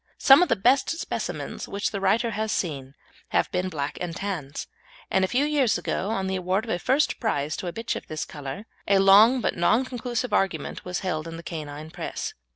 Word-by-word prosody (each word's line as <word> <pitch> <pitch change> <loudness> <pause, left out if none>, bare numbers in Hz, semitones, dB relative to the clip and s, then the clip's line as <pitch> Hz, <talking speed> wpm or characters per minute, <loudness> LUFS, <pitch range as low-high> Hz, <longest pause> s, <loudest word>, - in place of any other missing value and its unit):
Some 270 +4 +7
of 360 - +3
the - - +4
best 245 +7 +3
specimens 330 - -4
which 200 +1 -2
the 200 -2 -4
writer 225 +5 +2
has 215 0 -2
seen 140 -5 -3 0.3
have - - +1
been 180 0 -1
black 145 -4 -4
and 175 -2 -3
tans, 175 -8 -4 0.5
and 190 - +3
a - - +3
few 260 +8 +1
years 290 -6 +2
ago 195 - -2
on 195 -4 -1
the 190 0 -1
award 185 +3 0
of 225 - -4
a 175 - 0
first 275 +10 +1
prize 145 - -1
to 185 - -5
a - - -2
bitch 225 +6 -3
of - - -7
this 155 -1 -4
colour, 145 +7 -7 0.2
a 200 - +5
long 205 +6 +7
but - - 0
non 220 +9 +3
conclusive 245 -1 -3
argument 185 -7 0
was 180 0 -3
held 165 -4 -2
in 165 0 -7
the 170 - -9
canine 155 -2 -7
press. - - -5
190 Hz, 215 wpm, -25 LUFS, 165-230 Hz, 0.5 s, Some